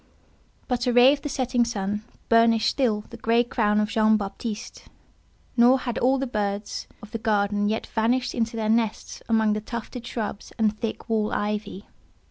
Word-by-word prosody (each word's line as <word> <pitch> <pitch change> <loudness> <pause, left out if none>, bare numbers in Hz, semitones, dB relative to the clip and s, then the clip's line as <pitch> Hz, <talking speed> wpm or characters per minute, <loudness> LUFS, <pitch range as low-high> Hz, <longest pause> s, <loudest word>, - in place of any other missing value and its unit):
But 250 -1 -1
a 245 - +2
ray 245 +3 +7
of 285 - -4
the 295 - -4
setting 255 -2 +1
sun 210 -2 -3 0.2
burnished 230 -1 +4
still 225 -6 +1
the 235 - -8
grey 230 +1 +2
crown 210 -3 +1
of 210 0 0
Jean 220 -1 +3
Baptiste; 210 +2 -6 0.7
nor 245 +2 +6
had 240 -2 -3
all 260 +2 +3
the 270 - -1
birds 205 -3 -3 0.2
of 210 - -11
the 230 - -4
garden 205 -1 +1
yet 220 - -2
vanished 240 +3 0
into 230 -1 -1
their 220 -1 -1
nests 225 0 -1
amongst 220 -2 +3
the 210 - -2
tufted 235 +2 -7
shrubs 215 -3 -5
and 215 -1 +2
thick 225 -1 -4
wall 220 -2 0
ivy. 205 -1 -3
225 Hz, 175 wpm, -25 LUFS, 210-240 Hz, 0.7 s, ray